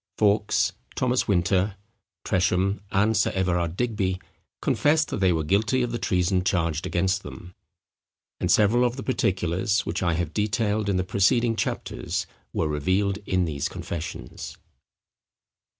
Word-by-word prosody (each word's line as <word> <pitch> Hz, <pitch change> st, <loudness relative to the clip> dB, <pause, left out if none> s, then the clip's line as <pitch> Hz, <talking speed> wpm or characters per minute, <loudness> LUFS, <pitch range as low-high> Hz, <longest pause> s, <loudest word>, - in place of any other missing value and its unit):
Fawkes, 105 Hz, 0 st, +2 dB, 0.2 s
Thomas 125 Hz, 0 st, +1 dB
Winter, 95 Hz, +1 st, +2 dB, 0.5 s
Tresham, 95 Hz, +2 st, +1 dB
and 105 Hz, +3 st, +2 dB
Sir 105 Hz, -, +3 dB
Everard 90 Hz, -2 st, 0 dB
Digby, 100 Hz, -6 st, -1 dB, 0.4 s
confessed 155 Hz, +1 st, +2 dB
that -, -, -3 dB
they 95 Hz, -2 st, +4 dB
were 80 Hz, -2 st, 0 dB
guilty 110 Hz, +10 st, +2 dB
of 120 Hz, -, -2 dB
the 120 Hz, -, -3 dB
treason 90 Hz, -1 st, +1 dB
charged 85 Hz, -4 st, 0 dB
against 95 Hz, +2 st, +1 dB
them; 80 Hz, +5 st, -10 dB, 0.9 s
and 90 Hz, -, -1 dB
several 110 Hz, +5 st, +4 dB
of 120 Hz, 0 st, +1 dB
the 130 Hz, -, -6 dB
particulars, 95 Hz, -4 st, 0 dB
which 85 Hz, -, -2 dB
I 85 Hz, -2 st, +1 dB
have 85 Hz, -1 st, -2 dB
detailed 105 Hz, 0 st, 0 dB
in 95 Hz, -, +1 dB
the 90 Hz, -, +1 dB
preceding 115 Hz, +5 st, +2 dB
chapters, -, -, -3 dB, 0.3 s
were 80 Hz, -, 0 dB
revealed 95 Hz, +7 st, 0 dB
in 90 Hz, -1 st, +2 dB
these 70 Hz, -4 st, -2 dB
confessions. 80 Hz, -7 st, -6 dB
95 Hz, 140 wpm, -25 LUFS, 90-110 Hz, 0.9 s, they